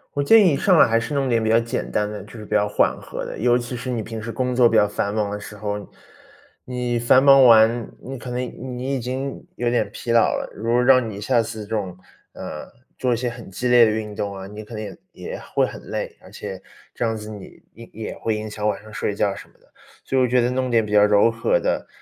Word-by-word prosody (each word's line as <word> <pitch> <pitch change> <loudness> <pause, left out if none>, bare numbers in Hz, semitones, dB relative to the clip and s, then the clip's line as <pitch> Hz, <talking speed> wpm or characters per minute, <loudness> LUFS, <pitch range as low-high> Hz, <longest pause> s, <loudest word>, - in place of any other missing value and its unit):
我 - - 0
建 225 +9 +7
议 - - +6
你 140 - +1
上 185 +4 +3
来 155 - +6
还 115 0 +3
是 115 +6 -4
弄 135 -2 0
点 115 -2 +2
比 - - 0
较 115 +1 +4
简 115 +2 -3
单 105 0 -1
的， 105 - -6
就 - - -15
是 110 -2 -9
比 - - -16
较 105 -1 +2
缓 105 - +1
和 - - -6
的， - - -7
尤 120 +2 +3
其 125 +1 -4
是 125 +2 -6
你 115 -3 -2
平 110 +1 -6
时 115 +2 -6
工 125 +1 -2
作 125 -2 +6
比 115 - +1
较 105 - +5
繁 100 0 -2
忙 105 -2 -1
的 105 - -4
时 105 +1 -10
候。 105 0 -4 0.8
你 125 -1 -2
繁 130 +3 +5
忙 135 -1 +8
完， 115 0 +5
你 135 +1 -7
可 125 - -8
能 125 - -3 0.4
你 130 +3 -2
已 135 - -2
经 130 +3 -4
有 120 - -1
点 120 - 0
疲 115 - -4
劳 115 - +6 0.2
了， - - -4
如 115 +2 -3
果 125 +1 +3
让 130 -3 +4
你 100 -1 -7
下 120 +2 +2
次 110 -1 -6
这 - - -15
种， 95 -5 -3 0.3
呃， 75 - -8 0.3
做 125 -1 0
一 - - +2
些 125 +2 -2
很 120 -3 -9
激 95 +6 -4
烈 120 -1 +7
的 110 - +3
运 105 -1 -3
动 100 -2 -4
啊， 95 0 -7
你 105 +2 -9
可 110 +2 -11
能 110 - -4
也 - - -8 0.2
也 - - -7
会 - - 0
很 - - -9
累， - - -5
而 - - -15
且 - - -8 0.3
这 - - -2
样 115 -1 0
子 105 0 -8
你 105 -3 -11
也 115 +2 -13
也 110 +1 -6
会 110 -1 -2
影 110 0 -5
响 105 0 -2
晚 105 - -2
上 110 - -13
睡 105 - -2
觉 100 -1 +1
什 - - -11
么 - - -28
的。 - - -30 0.3
所 135 - -2
以 130 - +4
我 125 - +2
觉 125 +1 +3
得 120 - +1
弄 130 0 -1
点 115 -2 +3
比 105 - -7
较 105 0 +6
柔 105 +1 +5
和 - - +1
的， - - -2
115 Hz, 295 characters per minute, -22 LUFS, 105-125 Hz, 0.8 s, 忙